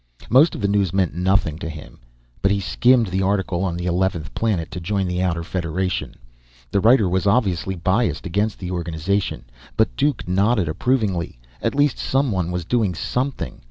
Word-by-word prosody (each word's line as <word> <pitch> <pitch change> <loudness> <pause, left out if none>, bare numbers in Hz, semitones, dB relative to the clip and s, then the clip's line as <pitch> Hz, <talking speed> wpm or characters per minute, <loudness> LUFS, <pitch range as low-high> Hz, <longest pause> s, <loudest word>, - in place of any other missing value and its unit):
Most 140 +7 +5
of - - -6
the 100 - +1
news 100 -3 +1
meant 95 -5 +1
nothing 90 -3 +1
to 80 - -5
him. 80 -1 -10 0.4
But 95 - +3
he 100 0 +1
skimmed 120 +3 +3
the 95 +1 -1
article 95 -2 0
on 85 -3 -1
the 90 - -4
eleventh 90 -2 -1
planet 100 -8 -1
to 90 - -5
join 95 +2 -1
the 90 0 -1
Outer 85 -2 0
Federation; 90 +1 -2 0.6
the - - +2
writer 110 0 +5
was 95 +2 0
obviously 95 -4 +1
biased 95 +8 0
against 100 +4 -1
the 90 -1 -6
organization, 85 -4 -2 0.3
but - - +2
Duke 145 - 0
nodded 100 +1 +2
approvingly. 95 - -1 0.2
At - - -1
least 145 -2 +2
someone 110 -11 0
was 90 -2 -3
doing 105 -4 +1
something. 125 - -3
95 Hz, 175 wpm, -22 LUFS, 85-105 Hz, 0.6 s, Most